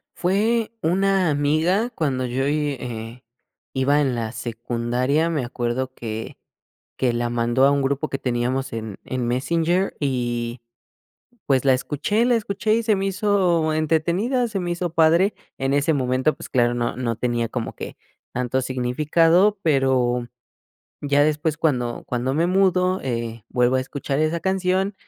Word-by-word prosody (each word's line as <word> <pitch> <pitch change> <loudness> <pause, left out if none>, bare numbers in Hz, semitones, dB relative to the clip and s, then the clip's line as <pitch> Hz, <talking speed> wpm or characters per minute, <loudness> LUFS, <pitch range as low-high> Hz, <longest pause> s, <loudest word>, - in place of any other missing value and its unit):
Fue 215 +5 +1
una 190 +2 +2
amiga 155 +10 +1
cuando 140 - -1
yo 130 +2 -1
y 150 0 0
eh, 115 0 -7 0.5
iba 140 +2 +2
en 135 -4 +1
la 115 -2 -3
secundaria, 120 +6 -1
me 150 -6 -1
acuerdo 125 +1 -3
que 110 -2 -6 0.6
que 125 -2 +2
la 120 0 -1
mandó 120 +2 +2
a - - +5
un 140 -1 +1
grupo 140 +3 -1
que 135 - -3
teníamos 130 +2 -1
en 110 -3 -5
en 130 -2 -3
Messenger 165 +9 0
y, 120 -3 -2 0.9
pues, 135 -2 +2
la 135 -1 +5
escuché 150 - 0
la 245 0 +3
escuché 215 0 0
y 230 - 0
se 220 -2 +2
me 195 0 -1
hizo 185 -5 +1
entretenida, 170 - +1
se 210 -3 -3
me 175 -1 -3
hizo 175 0 -2
padre. 170 +5 +4 0.2
En 135 +1 0
ese 145 +3 +2
momento, 130 +1 +1
pues, - - -10
claro, 120 -2 +2
no 120 -1 -2
no 120 -2 -1
tenía 120 -1 -1
como 115 0 -4
que - - -8 0.4
tanto 125 +1 -1
significado, 155 +10 +2
pero 130 -5 +2 0.7
ya 145 0 +3
después 155 +1 0
cuando 125 -7 -1
cuando 125 +2 -1
me 165 +3 +2
mudo, 185 0 +2
eh, 115 -3 -4
vuelvo 125 0 +2
a - - +1
escuchar 135 +1 -3
esa 155 +2 +1
canción, 190 +1 0
140 Hz, 155 wpm, -22 LUFS, 125-175 Hz, 0.9 s, a